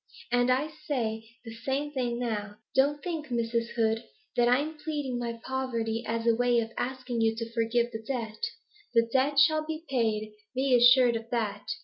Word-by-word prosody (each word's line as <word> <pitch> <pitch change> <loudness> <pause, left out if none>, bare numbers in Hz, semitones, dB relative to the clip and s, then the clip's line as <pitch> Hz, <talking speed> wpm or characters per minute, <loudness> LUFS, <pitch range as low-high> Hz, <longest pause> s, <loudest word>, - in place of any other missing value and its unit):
And 245 0 +3
I 260 +4 +2 0.2
say 225 -6 -1 0.2
the 225 - -7
same 270 +5 -2
thing 245 -4 -1
now. 215 -4 -3 0.2
Don't 285 +2 +2
think, 325 -4 -3
Mrs. 235 -1 0
Hood, 225 0 +1 0.3
that 240 0 +4
I'm 285 +6 +2
pleading 290 -5 -3
my 235 -1 -4
poverty 235 -4 -2
as 230 0 -1
a 230 - +5
way 245 0 +3
of 225 0 -3
asking 250 -2 -2
you 225 0 +3
to 230 0 -5
forgive 235 +1 +1
the 220 - -5
debt. 225 - -4 0.5
The 230 0 +5
debt 275 +2 +2
shall 310 +2 +5
be 315 +1 -5
paid; 220 -5 0 0.2
be 265 0 +2
assured 245 0 +7
of 225 0 -5
that. 230 -4 -2
240 Hz, 175 wpm, -29 LUFS, 230-265 Hz, 0.5 s, assured